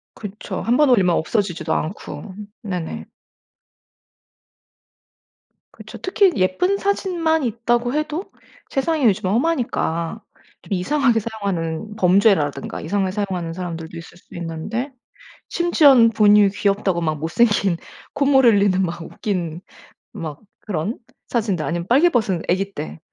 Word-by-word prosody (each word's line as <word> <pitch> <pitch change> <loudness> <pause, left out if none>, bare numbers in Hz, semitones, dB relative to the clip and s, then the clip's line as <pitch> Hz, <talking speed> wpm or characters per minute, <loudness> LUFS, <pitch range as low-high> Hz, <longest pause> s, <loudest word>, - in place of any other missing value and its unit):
그쵸. 205 -1 -6
1 240 +2 +2
번 295 -3 +4
올리면 185 -7 +4
없어지지도 170 -4 -1
않고. 185 +3 -4 0.3
네네. 180 -6 -5 2.7
그쵸. - - -11
특히 380 +1 +3
예쁜 190 - +1
사진만 345 -6 0
있다고 240 +2 0
해도 305 +5 -3 0.4
세상이 295 +1 0
요즘 205 -3 +2
험하니까 225 - -1 0.4
좀 - - -10
이상하게 240 +5 +2
사용하는 200 -3 -4
범죄라든가 180 -7 +2
이상하게 190 +3 -1
사용하는 185 -4 -3
사람들도 170 -2 -6
있을 165 +1 -11
수 - - -18
있는데 175 - -4 0.6
심지어는 285 -9 +5
부모님이 210 -2 +5
귀엽다고 200 -3 0
막 155 -2 -1
못생긴 195 +2 +2 0.4
콧물 275 -2 +3
흘리는 200 -4 +4
막 170 -2 -3
웃긴 175 -2 -4 0.5
막 155 -3 -7 0.2
그런 200 +3 -3 0.3
사진들 205 -9 -1
아니면 170 +1 -3
빨개 280 +9 +5
벗은 195 - 0
아기 195 +2 0
때 75 +1 -6
200 Hz, 285 characters per minute, -21 LUFS, 175-245 Hz, 2.7 s, 심지어는